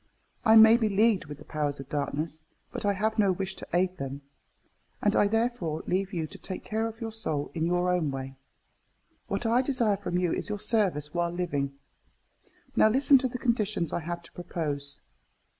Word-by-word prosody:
I 220 -2 +6
may 220 +1 +9
be 225 -3 +1
leagued 210 0 +3
with 145 -1 -8
the 150 - -14
powers 145 -2 -2
of 135 - -8
darkness, 155 +2 -3 0.3
but - - -3
I 200 - +3
have 215 +3 -1
no 200 -2 +4
wish 190 +1 -3
to - - -8
aid 180 +1 +1
them; 140 +1 -5 0.8
and 205 - +2
I 205 - +4
therefore 225 -8 -1
leave 190 +1 0
you 165 -5 -2
to - - -11
take 185 - -6
care 220 +1 -1
of 225 0 -8
your 225 -1 -4
soul 160 -10 -3
in 165 -1 0
your 175 +1 +1
own 170 -5 +1
way. 135 0 -5 0.9
What 200 +4 -2
I 235 +3 +4
desire 245 -6 +1
from 180 -3 -2
you 180 -2 +1
is - - -3
your 210 - -2
service 185 -10 0
while 175 -1 0
living. 150 -6 -2 1.0
Now 215 - +6
listen 270 +3 +5
to 260 - 0
the 250 0 -5
conditions 215 - 0
I - - 0
have 170 +1 -5
to - - -15
propose. 145 -5 -4
185 Hz, 195 wpm, -28 LUFS, 155-220 Hz, 1.0 s, may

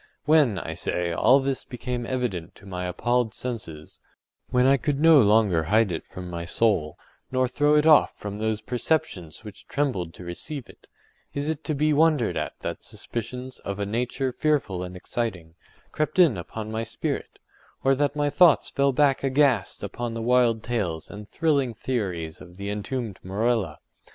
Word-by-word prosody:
When, 150 -9 +4
I - - -4
say, 90 -1 -2
all 125 +10 +5
this 135 -1 -2
became 125 -1 -5
evident 120 -11 -3
to - - -17
my 90 -2 -4
appalled 120 +5 0
senses—when 115 +3 -4
I 135 +1 +6
could 140 +1 -1
no 160 -2 +7
longer 105 -6 +3
hide 105 +3 +3
it 80 - -5
from 90 -1 -8
my 85 -1 -5
soul, 85 -4 +1 0.3
nor 130 0 +2
throw 145 +4 +2
it 150 0 +4
off 155 -2 +6
from 105 0 -6
those 110 0 -1
perceptions 120 - -2
which 105 -1 -11
trembled 100 - -1
to - - -10
receive 120 - -6
it—is 145 +2 -9
it 160 0 -6
to 155 - -1
be 150 +2 +2
wondered 150 -5 +3
at - - -3
that - - -5
suspicions, 125 +3 -6
of 100 -1 -5
a 100 - -2
nature 125 +5 -1
fearful 125 -9 0
and 90 0 -6
exciting, 90 -4 -4 0.4
crept 155 +3 -2
in 170 - +6
upon 105 +5 -6
my 110 0 -2
spirit, 115 0 -4 0.5
or 135 - +4
that 145 +1 0
my 145 -1 +1
thoughts 175 -3 +5
fell 140 0 +2
back 135 0 +2
aghast 135 - +2
upon 120 -1 -4
the 115 - -3
wild 120 -2 +3
tales 100 -10 -2
and 105 0 -9
thrilling 140 -7 +1
theories 90 -10 -3
of 90 0 -13
the 100 +1 -4
entombed 105 +1 -4
Morella? 100 -3 0
115 Hz, 170 wpm, -25 LUFS, 95-135 Hz, 0.5 s, no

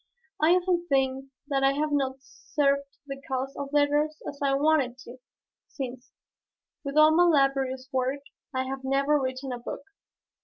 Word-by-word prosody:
I 320 +3 +5
often 355 -1 +1
think 270 -1 +1 0.2
that 275 -2 0
I 270 0 +4
have 300 +2 -1
not 270 -2 -1
served 280 -1 -1
the 275 -1 -7
cause 265 +1 -3
of 280 -1 -5
letters 295 +1 +2
as 285 - -7
I 275 -1 +2
wanted 280 -4 +2
to, 245 +2 -11 0.5
since, 255 -2 -7 0.7
with 280 +1 -4
all 305 0 +7
my 350 +1 +6
laborious 270 -4 +2
work 260 +2 0 0.3
I 260 -1 -1
have 265 0 -5
never 275 +2 +2
written 260 0 -3
a 245 - -4
book. 240 - -7
275 Hz, 160 wpm, -27 LUFS, 265-295 Hz, 0.7 s, all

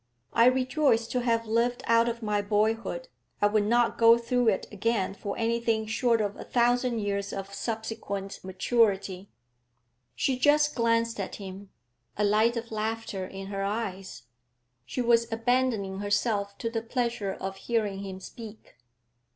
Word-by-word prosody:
I 230 - +5
rejoice 255 -2 +2
to 250 - 0
have 230 -1 +1
lived 235 +2 0
out 230 +1 +4
of 235 0 -5
my 210 -1 +1
boyhood; 220 - 0 0.3
I - - +3
would 205 0 +3
not 240 +1 +2
go 230 0 +7
through 240 +1 0
it 205 -4 +2
again 205 -1 0
for 200 0 -5
anything 230 -1 0
short 230 +1 +1
of 205 -1 -2
a - - -8
thousand 245 0 +2
years 200 -1 -2
of 195 0 -6
subsequent 220 -2 -4
maturity.' 195 -1 0 0.9
She 260 -2 0
just 295 +1 +4
glanced 230 -1 +1
at - - -4
him, 195 0 -9 0.5
a 210 - +1
light 215 +3 +3
of 230 0 -5
laughter 215 -3 -3
in 195 0 -8
her 195 - -2
eyes. 195 - -4 0.6
She 250 - -2
was 235 0 +3
abandoning 225 -4 0
herself 205 0 0
to 230 - -3
the 225 -1 -2
pleasure 235 -4 -2
of 190 0 -6
hearing 210 -3 -1
him 190 -1 -6
speak. 215 - -11
225 Hz, 150 wpm, -28 LUFS, 200-235 Hz, 0.9 s, go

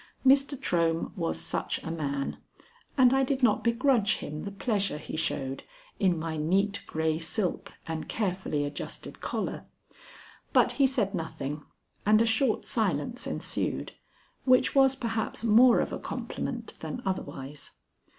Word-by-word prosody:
Mr. 275 0 +4
Trohm 165 -1 0
was 80 0 -1
such 80 - -1
a 160 - -4
man, 140 -4 -2 0.6
and 255 -1 +6
I 270 0 +4
did 265 0 -1
not 220 -4 +4
begrudge 235 -2 +3
him 150 +4 -6
the 200 - -4
pleasure 200 -3 -1
he 150 - -7
showed 135 -4 -2 0.4
in 185 -3 +3
my 160 0 -3
neat 195 +6 +1
gray 160 0 0
silk 175 +3 -2
and 160 -1 -4
carefully 185 -8 -1
adjusted 145 - -7
collar. - - -3 0.9
But - - +5
he 275 -2 +4
said 225 -7 0
nothing, 155 -4 -4 0.4
and 215 +1 +5
a 230 - +4
short 225 +1 +2
silence 220 - -1
ensued, - - -2 0.5
which 255 -1 +4
was 270 -1 +5
perhaps 230 -4 -2
more 235 +2 +6
of - - -1
a - - -3
compliment - - -5
than 250 -1 -5
otherwise. 145 -6 -5
195 Hz, 140 wpm, -29 LUFS, 160-240 Hz, 0.9 s, and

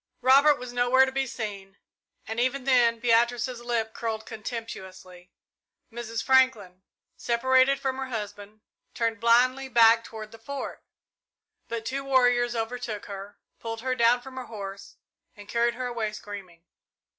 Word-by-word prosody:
Robert 280 +3 +6
was 250 -2 -8
nowhere 245 +2 +4
to 265 - -4
be 270 0 -1
seen, 200 -4 -6 0.5
and 225 +1 -4
even 260 +2 0
then 245 -3 +4
Beatrice's 240 +1 +1
lip 230 -2 -2
curled 220 -1 -4
contemptuously. 190 -6 -8 0.6
Mrs. 230 -1 -5
Franklin, 230 -9 +2 0.4
separated 260 +3 +3
from 265 -1 -2
her 265 0 -4
husband, 210 -2 -7 0.3
turned 230 -2 -1
blindly 255 +4 +3
back 230 -1 +6
toward 220 -2 -9
the 225 - -13
Fort, 280 +4 -6 0.9
but 230 -1 -5
two 275 +3 -3
warriors 245 -3 +3
overtook 225 -2 -4
her, 200 0 -9 0.2
pulled 225 -1 -5
her 260 +1 -1
down 240 0 +3
from 265 0 -11
her 255 - -5
horse, 200 -3 -8 0.4
and 205 -1 -13
carried 235 +1 +1
her 255 +1 -4
away 230 -3 -3
screaming. 190 -5 -10
235 Hz, 145 wpm, -26 LUFS, 215-255 Hz, 0.9 s, Robert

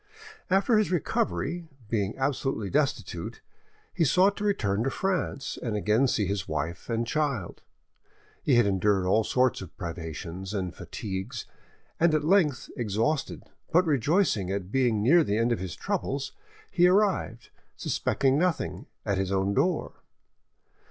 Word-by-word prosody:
After 200 +4 +4
his 215 - +1
recovery, 160 - -1 0.2
being 105 -2 -1
absolutely 135 -6 -1
destitute, 145 -1 -1 0.5
he 175 - +1
sought 185 +6 +4
to 210 - -4
return 110 - +1
to 135 - +1
France 185 -4 -2
and 115 -4 -2
again 105 +5 +2
see 110 -4 +1
his 100 -2 -2
wife 80 +6 -4
and 115 0 0
child: 140 - -2 0.8
he 135 - +3
had 120 -2 +5
endured 100 -1 +2
all 105 +4 +3
sorts 125 +1 +1
of 90 -3 -10
privations 85 +2 -6
and 90 -3 -3
fatigues, 95 -2 -5 0.5
and 165 -1 +4
at 150 - +1
length, 155 - +2
exhausted, 115 +6 -1 0.3
but 180 +2 +4
rejoicing 145 - +2
at 95 -1 -3
being 120 -5 +2
near 165 +8 +6
the 105 -6 0
end 115 +1 +2
of 115 - 0
his 90 -3 -5
troubles, 135 +1 -2 0.4
he 175 0 +5
arrived, 185 - +1 0.3
suspecting 135 +1 +1
nothing, 180 -2 -1 0.2
at 100 -2 0
his 95 0 -1
own 95 +1 +1
door. 175 - 0
120 Hz, 145 wpm, -27 LUFS, 100-155 Hz, 0.8 s, near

